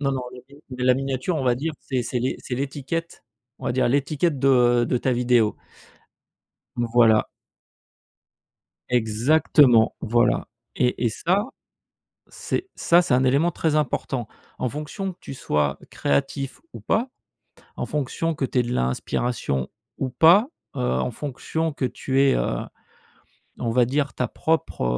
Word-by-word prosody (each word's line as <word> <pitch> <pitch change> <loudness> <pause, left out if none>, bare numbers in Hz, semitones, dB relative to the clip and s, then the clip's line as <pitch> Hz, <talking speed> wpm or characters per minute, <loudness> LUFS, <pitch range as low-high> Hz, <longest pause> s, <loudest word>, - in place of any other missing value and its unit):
Non, 140 -1 0
non 130 - -2
il - - -10
y 140 - -16
a 145 - -17
des 125 - -7
de 125 - -2
la 125 - +5
miniature 135 +5 -2
on 140 - -2
va 125 -1 +3
dire, 155 +6 -3
c'est 130 -2 -2
c'est 120 +1 -2
l'é 130 +2 -1
c'est 125 - -5
l'étiquette, 140 +5 -4 0.3
on - - -11
va 120 - +1
dire, 130 0 +2
l'étiquette 145 +3 0
de 125 -3 +4
de 125 - 0
ta 130 - 0
vidéo. 120 -3 +3 1.2
Mmh, 120 - 0
voilà. 110 -3 +5 1.6
Exactement, 120 +1 +4
voilà. 120 +2 +1 0.3
Et 125 -1 +1
et - - +4
ça, 185 - 0 0.8
c'est 375 +2 -4
ça, 170 +1 +4
c'est 150 - +1
un 130 +1 +3
élément 140 +7 +3
très 160 -2 -1
important. 130 -4 -1 0.3
En 125 - -1
fonction 155 - -5
que - - -24
tu 135 - -8
sois 75 - -1
créatif 135 - -1
ou - - -9
pas, 240 +4 0 0.7
en - - -3
fonction 150 +3 -2
que 140 -3 -1
tu 125 - 0
aies - - +3
de 120 +1 -3
l'inspiration 65 - -1 0.3
ou 130 - -2
pas, 170 - +5 0.3
heu, - - -4
en 65 - -1
fonction 150 +5 -3
que 135 - -2
tu 135 +1 0
aies, 140 -1 +4
heu, - - -1 1.0
on 115 - -2
va 120 +1 +4
dire, 140 +2 -1
ta 125 - -1
propre, 160 - -1
130 Hz, 165 wpm, -23 LUFS, 120-150 Hz, 1.6 s, la